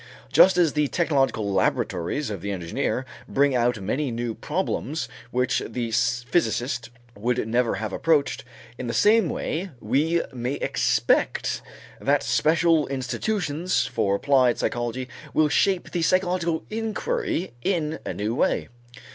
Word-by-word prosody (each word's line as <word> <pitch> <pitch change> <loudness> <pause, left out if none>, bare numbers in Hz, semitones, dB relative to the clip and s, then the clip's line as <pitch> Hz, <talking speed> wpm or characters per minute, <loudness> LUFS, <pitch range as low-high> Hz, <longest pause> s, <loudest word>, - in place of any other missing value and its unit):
Just 190 -1 +7
as 170 -4 +3
the 150 -1 +2
technological 135 - +1
laboratories 95 - 0
of 100 -4 -5
the 100 - -4
engineer 100 +8 -2 0.2
bring 140 0 +3
out 120 -2 +1
many 130 +9 -1
new 120 -1 -3
problems 150 +7 -2 0.2
which 125 0 +1
the 120 -2 -3
physicist 120 +1 0 0.3
would 120 +2 -1
never 120 0 +1
have 110 +2 -4
approached, 145 -6 +1 0.4
in 130 - -4
the 115 - -2
same 215 -4 +4
way 175 +7 -3
we 150 +10 +1
may 125 +1 -2
expect - - +1 0.4
that 140 -2 +2
special 155 +5 +3
institutions 150 - -1
for 105 -4 0
applied 130 +1 +3
psychology 120 +1 -2 0.3
will 155 -1 +4
shape 190 +4 +1
the 175 - -1
psychological 175 -1 +1
inquiry 225 - -2
in 160 -1 -1
a - - -4
new 105 +2 -2
way. - - 0
135 Hz, 130 wpm, -25 LUFS, 120-165 Hz, 0.4 s, Just